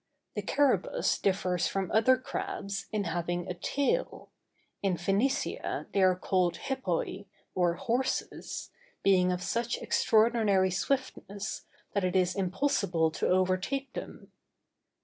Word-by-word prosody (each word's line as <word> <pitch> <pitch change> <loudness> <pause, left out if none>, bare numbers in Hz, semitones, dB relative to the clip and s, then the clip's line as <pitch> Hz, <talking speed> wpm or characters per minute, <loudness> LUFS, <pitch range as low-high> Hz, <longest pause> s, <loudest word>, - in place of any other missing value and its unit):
The - - -2
carabus - - +1
differs 185 -3 +1
from 195 -2 -2
other 255 +4 +5
crabs, 255 - -4
in 210 -1 0
having 175 0 -2
a 180 - -2
tail; 285 - -1 0.5
in 195 -3 +1
Phœnicia 195 - -1
they 200 - +2
are 185 -1 +5
called 180 -2 +1
hippoi, 200 -6 -2 0.3
or 175 -2 +2
horses, 260 +3 -2 0.3
being 185 -2 +4
of 180 0 -2
such 235 +3 -1
extraordinary 215 -4 +3
swiftness, 210 -2 -2 0.3
that 200 - +1
it 185 +1 0
is 185 -1 +2
impossible 185 - +1
to - - -1
overtake 185 +9 +1
them. - - -8
195 Hz, 120 wpm, -30 LUFS, 180-245 Hz, 0.5 s, other